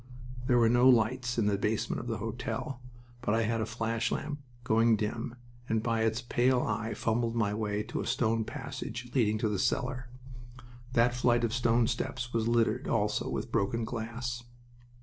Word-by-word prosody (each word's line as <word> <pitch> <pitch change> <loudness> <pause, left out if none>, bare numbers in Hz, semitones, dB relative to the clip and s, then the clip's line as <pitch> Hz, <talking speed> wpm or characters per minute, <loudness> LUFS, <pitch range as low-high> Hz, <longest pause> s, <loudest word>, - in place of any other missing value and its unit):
There 125 - +4
were 115 -1 +5
no 120 +2 +6
lights 120 +1 +2
in 115 - +2
the 100 -1 +1
basement 105 +1 0
of - - -6
the - - -1
hotel, 130 -2 -4 0.4
but 110 -3 +1
I 115 - +2
had 115 +1 0
a 110 - -1
flash 110 0 -1
lamp, 150 -1 -3 0.2
going 115 0 +4
dim, 115 +3 -3 0.3
and 110 0 +1
by 115 -1 +1
its 110 +1 +1
pale 125 +1 +2
eye 110 +1 -2
fumbled 115 0 0
my 105 -3 +1
way 105 -1 -1
to - - -4
a - - -4
stone 115 -1 +1
passage 120 +2 -6
leading 110 -5 +3
to 110 - 0
the 105 -3 -1
cellar. 125 -1 -1 0.8
That 120 0 +4
flight 120 -1 +2
of 115 -1 0
stone 120 -2 +3
steps 120 +1 -3
was 115 -1 +1
littered 115 +1 +2
also 105 -2 0
with - - -3
broken 115 +4 0
glass. 120 +1 -4
115 Hz, 180 wpm, -30 LUFS, 110-120 Hz, 0.8 s, no